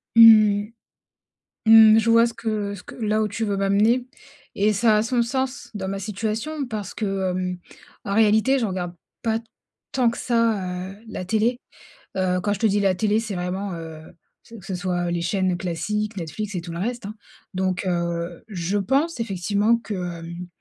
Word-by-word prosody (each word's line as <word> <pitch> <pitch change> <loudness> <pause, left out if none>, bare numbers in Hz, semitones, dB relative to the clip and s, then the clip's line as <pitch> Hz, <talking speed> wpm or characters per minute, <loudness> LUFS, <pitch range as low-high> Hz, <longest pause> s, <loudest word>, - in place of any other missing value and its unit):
Mmh, 215 -2 +7 1.0
mmh. 220 0 +8
Je 225 - 0
vois 230 0 +6
ce 235 - -3
que 210 -3 -3
ce 180 - -12
que - - -11
là 215 -2 0
où 215 - +1
tu 210 +3 -4
veux 200 -2 -1
m'amener 210 +6 +2 0.5
et 210 +2 +2
ça 215 +1 +3
a 210 - +2
son 240 +1 +1
sens 260 +3 -2
dans 190 -2 -4
ma 195 0 -3
situation 220 +9 -3
parce 215 -5 -5
que, 195 -3 -1
hem, 180 0 -2 0.5
en 200 - -3
réalité 220 +5 +4
je 235 - 0
regarde 180 -3 -4 0.3
pas 225 -1 0 0.5
tant 250 -3 +2
que 235 - -5
ça 195 -6 0
heu, 195 - -13
la 200 -4 -5
télé. 225 +5 +1 0.6
Heu, 185 -1 +1
quand 205 +2 0
je 200 - -5
te 225 - +1
dis 205 0 +1
la 195 -2 +3
télé 215 +2 +1
c'est 220 -2 -4
vraiment, 185 +2 -3
heu, 160 -1 -8 0.4
ce 230 - -14
que 195 - -12
ce 190 - -3
soit, 175 -1 -1
heu, - - -1
les 170 0 -1
chaînes 185 0 0
classiques, 190 +5 -2
Netflix 195 +5 -5
et 175 - -2
tout 170 - -8
le 170 - -5
reste, 235 +3 -3
hein. 215 - -7 0.4
Donc, 185 0 -1
heu, 170 -1 -2
je 190 -1 -2
pense 270 - 0
effectivement 205 +1 +1
que, 230 -2 -7
hem, 175 -1 -6
205 Hz, 190 wpm, -23 LUFS, 185-225 Hz, 1.0 s, mmh